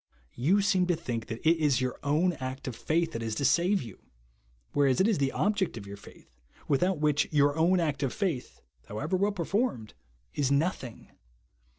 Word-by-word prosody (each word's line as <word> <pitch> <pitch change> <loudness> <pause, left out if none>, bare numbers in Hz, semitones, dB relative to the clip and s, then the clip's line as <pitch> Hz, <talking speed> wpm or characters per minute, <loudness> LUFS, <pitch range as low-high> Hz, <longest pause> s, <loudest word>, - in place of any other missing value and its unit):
You 180 +12 +2
seem 185 -2 +2
to 175 - +2
think 120 -9 -4
that 115 +7 -4
it 165 +1 +5
is 145 -5 +2
your 130 -1 -2
ov>'d 160 +5 +2
act 130 +1 -5
of 125 - -4
faith 165 +5 0
that 115 - -5
is 110 -1 -3
to 140 - -1
save 175 +6 +3
you; 115 -5 -11 0.7
whereas 140 -3 +3
it 190 - +4
is 215 -8 +1
the 135 -1 +1
object 205 - 0
of 100 - -8
your 100 0 -8
faith, 65 -9 -17 0.3
Avithout 180 +6 +2
which 150 0 +1
your 145 -1 +3
own 175 +3 +3
act 150 -5 -1
of 135 -3 0
faith, 170 -11 -3 0.3
how^ever 145 - -4
well 200 +3 +1
per 180 -5 -4
formed, 195 - -1 0.4
is 140 -2 0
nothing. 140 -5 -1
150 Hz, 195 wpm, -29 LUFS, 130-180 Hz, 0.7 s, it